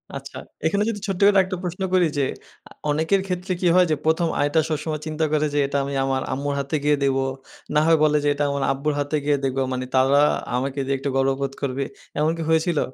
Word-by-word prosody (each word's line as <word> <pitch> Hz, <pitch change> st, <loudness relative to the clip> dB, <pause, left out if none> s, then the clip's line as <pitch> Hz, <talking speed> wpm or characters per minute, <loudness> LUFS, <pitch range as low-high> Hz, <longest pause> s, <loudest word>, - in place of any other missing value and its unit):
আচ্ছা। -, -, -8 dB, 0.3 s
এখানে 200 Hz, +6 st, +2 dB
যদি 205 Hz, -, -3 dB
ছোট্ট 195 Hz, -2 st, -2 dB
করে 205 Hz, -, +6 dB
আরেকটা 185 Hz, 0 st, 0 dB
প্রশ্ন 180 Hz, +2 st, -5 dB
করি 180 Hz, -1 st, +5 dB
যে -, -, +2 dB, 0.5 s
আ -, -, -35 dB, 0.2 s
অনেকের 160 Hz, +6 st, +2 dB
ক্ষেত্রে 185 Hz, 0 st, -2 dB
কি 180 Hz, -, +2 dB
হয় 180 Hz, 0 st, +6 dB
যে 155 Hz, -, +3 dB
১ম 160 Hz, +2 st, +2 dB
আয়টা 145 Hz, +3 st, +2 dB
সবসময় 155 Hz, 0 st, -2 dB
চিন্তা 155 Hz, 0 st, -1 dB
করে 155 Hz, 0 st, +2 dB
যে 145 Hz, -, +1 dB
এটা 140 Hz, -, -1 dB
আমি 140 Hz, +1 st, -4 dB
আমার 135 Hz, 0 st, 0 dB
আম্মুর 140 Hz, +2 st, -2 dB
হাতে 140 Hz, +3 st, -2 dB
গিয়ে 150 Hz, 0 st, +4 dB
দেবো। 135 Hz, -1 st, +2 dB, 0.5 s
না 150 Hz, -, +6 dB
হয় 165 Hz, 0 st, +5 dB
বলে 150 Hz, 0 st, +4 dB
যে -, -, +1 dB
এটা 145 Hz, +1 st, -1 dB
আমার 140 Hz, -1 st, -1 dB
আব্বুর 140 Hz, +3 st, -1 dB
হাতে 145 Hz, +2 st, -1 dB
গিয়ে 145 Hz, -1 st, +3 dB
দেবো। 135 Hz, 0 st, 0 dB
মানে 130 Hz, 0 st, -3 dB
তারা 135 Hz, +2 st, +4 dB, 0.4 s
আমাকে 135 Hz, +2 st, -2 dB
দিয়ে 135 Hz, +1 st, 0 dB
একটু 140 Hz, +1 st, -3 dB
গর্ববোধ 135 Hz, 0 st, 0 dB
করবে। 140 Hz, 0 st, -1 dB, 0.4 s
এমন 155 Hz, +2 st, +2 dB
কি -, -, -4 dB
হয়েছিল? 160 Hz, 0 st, +2 dB
150 Hz, 225 wpm, -23 LUFS, 140-165 Hz, 0.5 s, করে